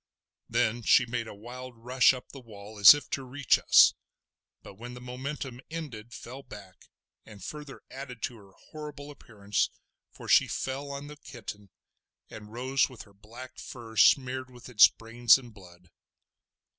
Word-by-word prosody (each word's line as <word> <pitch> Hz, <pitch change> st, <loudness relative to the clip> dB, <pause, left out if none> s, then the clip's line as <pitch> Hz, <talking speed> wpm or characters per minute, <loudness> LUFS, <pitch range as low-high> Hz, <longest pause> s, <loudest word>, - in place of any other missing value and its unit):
Then 120 Hz, 0 st, 0 dB
she 115 Hz, -, +4 dB
made 120 Hz, -1 st, -4 dB
a 105 Hz, -, -9 dB
wild 125 Hz, +3 st, -10 dB
rush 125 Hz, +2 st, +4 dB
up 130 Hz, -1 st, -8 dB
the 140 Hz, -, -10 dB
wall 105 Hz, -3 st, -12 dB
as 100 Hz, +7 st, +11 dB
if 145 Hz, -, -7 dB
to 135 Hz, -, -2 dB
reach 130 Hz, -1 st, +1 dB
us, -, -, +6 dB, 0.7 s
but -, -, -11 dB
when 120 Hz, +5 st, -10 dB
the -, -, -9 dB
momentum 125 Hz, +1 st, -6 dB
ended 130 Hz, -9 st, -7 dB
fell 125 Hz, +3 st, -9 dB
back, 100 Hz, -7 st, -14 dB, 0.3 s
and 105 Hz, -2 st, -14 dB
further 150 Hz, -2 st, -9 dB
added 130 Hz, -3 st, -9 dB
to 120 Hz, -, -3 dB
her 100 Hz, -2 st, -18 dB, 0.2 s
horrible 150 Hz, -2 st, -8 dB
appearance 105 Hz, -7 st, -2 dB, 0.4 s
for -, -, -12 dB
she -, -, +5 dB
fell 135 Hz, +2 st, -4 dB
on 140 Hz, 0 st, -6 dB
the 150 Hz, 0 st, -11 dB
kitten, 105 Hz, -8 st, -10 dB, 0.6 s
and 105 Hz, 0 st, -11 dB
rose 130 Hz, +4 st, 0 dB
with 125 Hz, -4 st, -11 dB
her 100 Hz, -, -21 dB
black 120 Hz, +6 st, -12 dB
fur 115 Hz, -3 st, -10 dB
smeared 130 Hz, +1 st, +3 dB
with 125 Hz, -1 st, -13 dB
its 105 Hz, -4 st, +8 dB
brains 115 Hz, +2 st, +3 dB
and 120 Hz, -4 st, -13 dB
blood. 90 Hz, -3 st, -17 dB
120 Hz, 165 wpm, -28 LUFS, 110-135 Hz, 0.7 s, as